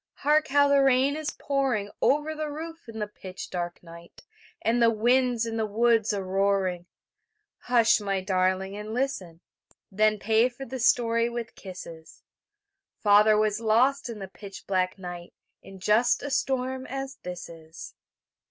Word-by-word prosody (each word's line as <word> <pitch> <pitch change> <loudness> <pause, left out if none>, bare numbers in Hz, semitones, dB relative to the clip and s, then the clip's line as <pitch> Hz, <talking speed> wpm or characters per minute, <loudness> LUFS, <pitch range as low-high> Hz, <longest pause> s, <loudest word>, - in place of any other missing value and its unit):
Hark 300 +1 +2
how 285 +1 +4
the 280 0 +4
rain 270 +1 +3
is 310 -1 -3
pouring 260 -8 -1
Over 300 +2 +2
the 310 -1 -4
roof 320 -2 -8
in 225 - -8
the 210 - -2
pitch 185 -2 -9
dark 175 -1 -4
night, 170 0 -14 0.4
And 235 +2 +2
the 230 - +6
winds 240 +1 +2
in 225 0 -4
the 220 - 0
woods 225 0 +2
a 200 -2 -2
roaring 190 -2 0 0.7
Hush, 235 -2 +3
my 195 -2 -1
darling, 190 +1 0
and 210 +2 -6
listen, 190 -11 -3 0.5
Then 215 +2 +2
pay 220 +4 +2
for 255 +2 -9
the 260 +1 -6
story 230 -1 +2
with 235 -1 -6
kisses; 170 -4 -11 0.7
Father 210 +1 +5
was 215 0 +1
lost 245 +5 +2
in 230 - -6
the 195 -2 -7
pitch 195 +1 -11
black 185 -1 0
night 175 -2 -9 0.3
In 195 -1 -13
just 215 +6 +3
such - - -5
a - - -5
storm 260 -2 -1
as 270 0 -5
this 180 -1 -7
is. 160 -1 -11
220 Hz, 160 wpm, -26 LUFS, 190-260 Hz, 0.7 s, the